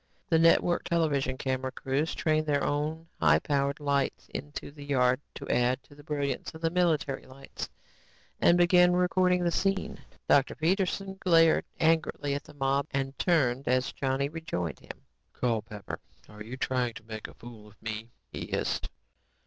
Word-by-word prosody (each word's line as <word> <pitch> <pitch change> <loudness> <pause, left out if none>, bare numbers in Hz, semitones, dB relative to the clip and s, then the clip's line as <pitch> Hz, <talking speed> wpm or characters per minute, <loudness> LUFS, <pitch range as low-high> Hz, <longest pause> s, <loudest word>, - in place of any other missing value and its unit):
The 160 - +4
network 165 +1 +4
television 145 -6 +1
camera 130 -1 -2
crews 135 +4 -1
trained 155 -1 +1
their 145 -1 +2
own 155 +3 -1
high 75 -1 +5
powered 140 - 0
lights 140 -2 -1
into 145 0 -6
the 145 0 -11
yard 130 -2 +2
to - - -7
add 125 +2 +1
to - - -18
the 145 0 -15
brilliance 145 -1 -3
of 160 - -10
the 165 0 +1
military 165 -6 +1
lights 135 +1 -8 0.7
and 170 - +6
began 180 0 +5
recording 180 0 +2
the 170 - +2
scene. 195 +2 -1 0.3
Dr. 140 -1 +4
Peterson 190 +3 0
glared 165 -3 +4
angrily 160 -3 +1
at 145 +1 -4
the - - -14
mob 140 +1 +1
and 135 0 -2
turned 135 -7 +2
as 130 +1 +2
Johnny 135 0 0
rejoined 145 - -4
him. - - -11 0.3
"Culpepper, 110 -4 -3 0.3
are 105 0 -13
you 115 +4 -7
trying 125 -3 -1
to 110 - -10
make 110 -1 -7
a - - -14
fool 115 -3 -12
of 105 0 -19
me?" 110 +1 -5 0.2
he - - -5
hissed. - - -2
140 Hz, 165 wpm, -29 LUFS, 130-165 Hz, 0.7 s, and